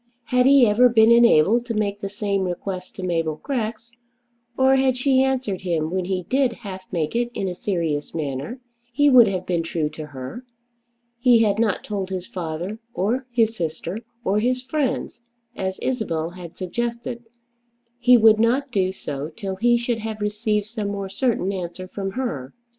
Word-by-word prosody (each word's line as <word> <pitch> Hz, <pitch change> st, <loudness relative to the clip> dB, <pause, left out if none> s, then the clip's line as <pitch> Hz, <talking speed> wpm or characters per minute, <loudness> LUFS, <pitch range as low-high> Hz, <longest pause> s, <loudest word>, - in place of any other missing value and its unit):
Had 250 Hz, +1 st, +2 dB
he 275 Hz, -2 st, +7 dB
ever 235 Hz, +4 st, +5 dB
been 225 Hz, -1 st, +5 dB
enabled 235 Hz, 0 st, +5 dB
to 230 Hz, -, -2 dB
make 205 Hz, -1 st, -1 dB
the 200 Hz, -, -3 dB
same 200 Hz, -1 st, -1 dB
request 185 Hz, +1 st, -5 dB
to 190 Hz, -, -7 dB
Mabel 165 Hz, -3 st, 0 dB
Grex, 235 Hz, -4 st, -3 dB, 0.7 s
or 265 Hz, 0 st, +5 dB
had 260 Hz, -1 st, +2 dB
she 260 Hz, 0 st, +3 dB
answered 260 Hz, -8 st, 0 dB
him 165 Hz, -3 st, -1 dB
when 185 Hz, -1 st, -1 dB
he 185 Hz, -1 st, -2 dB
did 260 Hz, +5 st, +1 dB
half 190 Hz, -4 st, -9 dB
make 165 Hz, 0 st, -2 dB
it 240 Hz, 0 st, +1 dB
in 195 Hz, -, -2 dB
a 180 Hz, -, -2 dB
serious 165 Hz, -6 st, -2 dB
manner, 145 Hz, -, -4 dB, 0.3 s
he 290 Hz, +3 st, +4 dB
would 245 Hz, -3 st, +8 dB
have 190 Hz, -2 st, -2 dB
been 175 Hz, -2 st, 0 dB
true 165 Hz, -2 st, -2 dB
to 155 Hz, 0 st, -8 dB
her. 140 Hz, -, -8 dB, 0.8 s
He 240 Hz, -2 st, +5 dB
had 205 Hz, -1 st, +1 dB
not 220 Hz, -4 st, +1 dB
told 195 Hz, -3 st, -4 dB
his 185 Hz, -2 st, -4 dB
father, 175 Hz, +4 st, -5 dB, 0.2 s
or 245 Hz, +7 st, -1 dB
his 230 Hz, -2 st, +1 dB
sister, 170 Hz, +2 st, -4 dB, 0.2 s
or 200 Hz, 0 st, +1 dB
his 250 Hz, +3 st, 0 dB
friends, 265 Hz, -4 st, -2 dB, 0.3 s
as 190 Hz, 0 st, -3 dB
Isabel 170 Hz, -10 st, -1 dB
had 175 Hz, -2 st, -10 dB
suggested. 235 Hz, +5 st, -4 dB, 0.7 s
He 245 Hz, 0 st, +6 dB
would 220 Hz, -1 st, +6 dB
not 255 Hz, +5 st, +2 dB
do 190 Hz, -4 st, +1 dB
so 145 Hz, -5 st, -5 dB
till 195 Hz, -1 st, -6 dB
he 240 Hz, +3 st, +3 dB
should 235 Hz, -1 st, -2 dB
have 220 Hz, 0 st, -5 dB
received 210 Hz, 0 st, -1 dB
some 215 Hz, -1 st, -4 dB
more 200 Hz, -1 st, -4 dB
certain 200 Hz, -2 st, 0 dB
answer 180 Hz, 0 st, -5 dB
from 195 Hz, 0 st, -5 dB
her. 150 Hz, -, -4 dB
210 Hz, 175 wpm, -23 LUFS, 180-240 Hz, 0.8 s, would